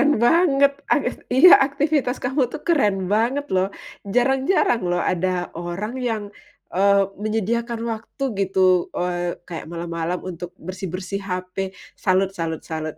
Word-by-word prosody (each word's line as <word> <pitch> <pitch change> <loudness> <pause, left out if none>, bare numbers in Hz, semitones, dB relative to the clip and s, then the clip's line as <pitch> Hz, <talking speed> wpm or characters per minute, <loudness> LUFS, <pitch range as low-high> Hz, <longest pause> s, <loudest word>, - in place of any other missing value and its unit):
keren 290 +1 +4
banget, 280 -2 +4 0.2
avis 280 -5 0
iya 285 +8 +8
aktivitas 280 -1 +1
kamu 255 0 0
tuh 310 - -5
keren 205 - +2
banget 245 +7 +1
loh, 190 +1 +2 0.4
jarang-jarang 260 - +2
loh 175 - +1
ada 180 0 -1
orang 175 +7 -5
yang, 225 -4 -1 0.5
eee, 200 +1 +4 0.2
menyediakan 225 +2 -1 0.2
waktu 225 +5 -6 0.2
gitu, 185 -2 +3
eee, 175 -1 -1
kayak 165 -2 -7
malam-malam 170 +1 -4
untuk 175 0 -7
bersih-bersih 185 +2 -5
HP, 185 +1 -4 0.2
salut 190 0 +1
salut 165 -3 -4
salut. 155 -1 -5
195 Hz, 130 wpm, -22 LUFS, 180-250 Hz, 0.5 s, iya